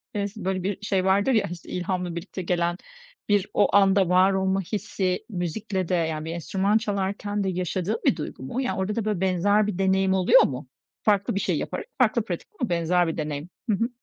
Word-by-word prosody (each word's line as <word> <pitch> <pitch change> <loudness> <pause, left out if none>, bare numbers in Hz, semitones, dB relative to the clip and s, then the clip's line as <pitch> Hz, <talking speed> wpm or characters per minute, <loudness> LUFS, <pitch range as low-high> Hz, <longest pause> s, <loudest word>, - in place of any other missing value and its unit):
eee, 200 -1 0
si 205 -1 -9
böyle 190 -1 -1
bir 195 +1 -2
şey 195 -2 0
vardır 200 +6 +3
ya, 220 - +2
işte, 175 -2 -9
ilhamla 180 -1 -2
birlikte 185 +2 -6
gelen 175 -1 0 0.5
bir 205 -1 +2
o 200 - +3
anda 195 -2 +5
var 185 +2 +5
olma 190 0 +1
hissi 185 -1 -2
müzikle 185 0 -3
de 185 - +2
yani 160 -2 -1
bir 160 - -4
enstrüman 190 +5 +1
çalarken 205 -1 -2
de 190 - 0
yaşadığın 185 +3 -1
bir - - +4
duygu 150 -4 -6
mu? 240 - -3
Yani 195 -7 -2
orada 195 +2 -1
da 230 - -2
böyle 210 -4 -1
benzer 200 +3 +2
bir 205 -4 -3
deneyim 190 0 +2
oluyor 185 -1 +6
mu? 130 0 -3 0.4
Farklı 200 -2 +2
bir - - +1
şey - - 0
yaparak - - -4
farklı - - +2
pratik - - -5
ama 245 - -1
benzer 175 +1 +2
bir 160 - -3
deneyim. 150 +1 -4 0.2
Hı 210 - +4
hı. 230 +5 0
190 Hz, 210 wpm, -25 LUFS, 175-205 Hz, 0.5 s, oluyor